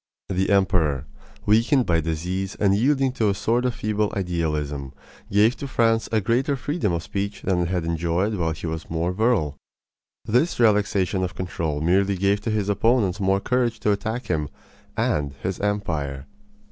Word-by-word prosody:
The 95 0 0
emperor, 85 -9 +2 0.4
weakened 115 +5 +3
by 85 -1 +2
disease 90 +5 -3
and 100 -2 +2
yielding 135 +4 +2
to 110 -5 +1
a 100 - 0
sort 120 +5 0
of 125 -2 0
feeble 105 -2 -1
idealism, 75 -6 -2 0.4
gave 105 +5 +4
to 140 - -5
France 115 -3 +1
a 110 - +3
greater 125 +7 +1
freedom 140 - -1
of 85 -1 -2
speech 100 +3 -4
than 95 -2 +1
it 85 - 0
had 90 -2 -1
enjoyed 85 +5 0
while 85 -5 0
he 80 +1 -6
was 80 -1 -5
more 85 +2 -1
virile. 95 - +1 0.7
This 125 +9 +1
relaxation 100 -4 +2
of 90 -4 -3
control 80 -5 -3
merely 95 +4 +2
gave 100 +2 +1
to - - -3
his 105 -2 0
opponents 105 -1 +2
more 95 0 +2
courage 120 0 0
to 105 - +2
attack 110 +4 -2
him 75 -7 -1 0.5
and 70 -2 0
his 95 0 -2
empire. 80 -10 -2
100 Hz, 170 wpm, -23 LUFS, 85-110 Hz, 0.7 s, gave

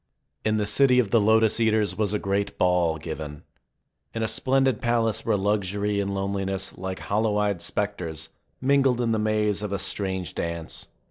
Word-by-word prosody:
In 110 0 +1
the 105 - 0
city 125 +5 +4
of 115 -6 +2
the 115 - +4
Lotus 110 +1 +4
eaters 110 -4 +2
was 105 -1 0
a 105 - +1
great 100 0 -2
ball 90 -3 +2
given. 75 -2 -7 0.7
In 115 - -1
a - - +1
splendid 130 -1 +2
palace 115 -2 +1
where 110 -2 +1
luxury 100 0 0
and 100 0 -1
loneliness, 95 0 -2
like 95 0 -5
hollow 105 0 0
eyed 100 -4 0
specters, 85 -5 -3 0.3
mingled 135 -2 +3
in 120 -2 +1
the 110 - +1
maze 105 -1 +1
of 105 -2 -4
a 100 - 0
strange 95 -2 -2
dance. 85 -1 -4
105 Hz, 175 wpm, -25 LUFS, 95-110 Hz, 0.7 s, city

